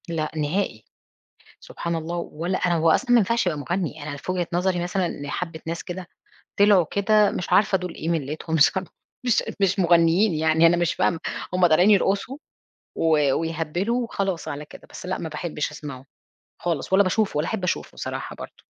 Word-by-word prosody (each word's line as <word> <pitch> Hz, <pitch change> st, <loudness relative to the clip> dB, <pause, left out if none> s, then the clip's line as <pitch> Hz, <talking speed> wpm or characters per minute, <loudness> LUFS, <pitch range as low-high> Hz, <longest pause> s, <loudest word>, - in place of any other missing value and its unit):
لأ، 155 Hz, -2 st, -2 dB
نهائي. 150 Hz, -, -1 dB, 0.8 s
سبحان 170 Hz, 0 st, -5 dB
الله! 165 Hz, +2 st, -4 dB
ولا 170 Hz, +2 st, -3 dB
أنا 175 Hz, -1 st, +1 dB
هو 165 Hz, 0 st, +3 dB
أصلًا 245 Hz, +9 st, +1 dB
ما 245 Hz, -, +7 dB
ينفعش 230 Hz, 0 st, +1 dB
يبقى 160 Hz, -4 st, 0 dB
مُغني، 165 Hz, 0 st, -3 dB
أنا 145 Hz, -1 st, -5 dB
في 185 Hz, -, -4 dB
وجهة 180 Hz, -2 st, -1 dB
نظري 180 Hz, 0 st, +1 dB
مثلًا 180 Hz, 0 st, -1 dB
لحَبِّة 160 Hz, +3 st, -5 dB
ناس 165 Hz, 0 st, -4 dB
كده 180 Hz, 0 st, -7 dB, 0.5 s
طِلعوا 200 Hz, -4 st, +6 dB
كده 210 Hz, +1 st, +3 dB
مش 180 Hz, -, -4 dB
عارفة 195 Hz, -1 st, +4 dB
دُول 180 Hz, -1 st, -6 dB
إيه 160 Hz, -, -4 dB
مِلّتهم 160 Hz, 0 st, -2 dB
صرا 185 Hz, +5 st, +4 dB, 0.4 s
مش 245 Hz, -, +3 dB
أد -, -, -7 dB
مش 195 Hz, 0 st, +2 dB
مغنيين 170 Hz, +3 st, +4 dB
يعني 160 Hz, +1 st, +4 dB
أنا 175 Hz, +1 st, +3 dB
مش 175 Hz, -1 st, +1 dB
فاهمة. 165 Hz, -, +1 dB, 0.3 s
هم 180 Hz, -1 st, +4 dB
طالعين 175 Hz, +5 st, +4 dB
يرقصوا 200 Hz, +6 st, +1 dB, 0.6 s
و 150 Hz, -4 st, +3 dB
ويهَبِّلوا 165 Hz, +9 st, -1 dB
وخلاص 195 Hz, -7 st, -3 dB
على 145 Hz, +1 st, -5 dB
كده. -, -, -14 dB
بس -, -, -9 dB
لأ، 185 Hz, +1 st, -2 dB
ما 160 Hz, -, -5 dB
باحبش 150 Hz, -1 st, -3 dB
أسمعه، 145 Hz, -4 st, -8 dB, 0.6 s
خالص 170 Hz, -1 st, -2 dB
ولا 195 Hz, +1 st, +6 dB
باشوفه، 200 Hz, -1 st, 0 dB
ولا 150 Hz, +2 st, +1 dB
أحب 205 Hz, -5 st, -3 dB
أشوفه 180 Hz, -, -3 dB
صراحة -, -, -5 dB
برضه. -, -, -11 dB
175 Hz, 180 wpm, -24 LUFS, 160-190 Hz, 0.8 s, ما